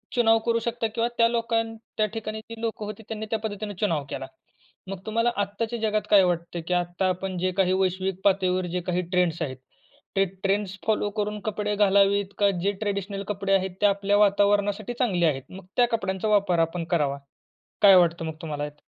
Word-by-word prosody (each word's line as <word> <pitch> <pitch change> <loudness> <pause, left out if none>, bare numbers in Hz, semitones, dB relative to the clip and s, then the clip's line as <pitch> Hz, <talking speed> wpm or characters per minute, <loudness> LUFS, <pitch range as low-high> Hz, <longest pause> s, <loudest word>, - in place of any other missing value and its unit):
चुनाव 225 -2 +5
करू 230 -1 +2
शकता 230 0 -2
किंवा 230 0 +1
त्या 230 - +5
लोकां 230 -1 +1 0.3
त्या 215 - +3
ठिकाणी 220 -1 -4
जी 225 +1 -10
लोकं 220 -2 -3
होती 215 +2 -7
त्यांनी 220 -1 -4
त्या 225 - 0
पद्धतीनं 210 -1 -4
चुनाव 165 -9 0
केला. 135 - -4 0.6
मग 195 -2 -5
तुम्हाला 230 +2 +1
आत्ताच्या 220 +4 -3
जगात 215 -1 +1
काय 200 -3 +7
वाटतं 170 -1 -1
की 180 - 0
आता 175 +1 0
आपण 185 0 -3
जे 185 +1 0
काही 185 -1 +3
वैश्विक 190 0 -1
पातळीवर 185 -2 +2
जे 180 - 0
काही 180 0 +1
ट्रेंड्स 175 -2 +1
आहेत, 130 -5 -3 0.6
ते 195 - +5 0.2
ट्रेंड्स 200 0 0
फॉलो 210 -1 +1
करून 210 0 -2
कपडे 210 0 -2
घालावीत, 200 0 +3
का 200 -1 +5
जे 200 +2 +2
ट्रेडिशनल 200 -1 -2
कपडे 195 -1 -1
आहेत 190 -1 +2
ते - - +4
आपल्या 200 0 +2
वातावरणासाठी 205 +1 +2
चांगले 185 -9 +2
आहेत, 135 -4 -1
मग 190 0 -11
त्या 245 -1 +5
कपड्यांचा 195 -3 -1
वापर 200 -5 +3
आपण 165 +1 0
करावा. 145 -5 +1 0.7
काय 195 -2 +9
वाटतं 170 -1 +3
मग 160 - -4
तुम्हाला 150 -3 -4
ह्यात? 150 0 -9
200 Hz, 190 wpm, -25 LUFS, 180-215 Hz, 0.7 s, काय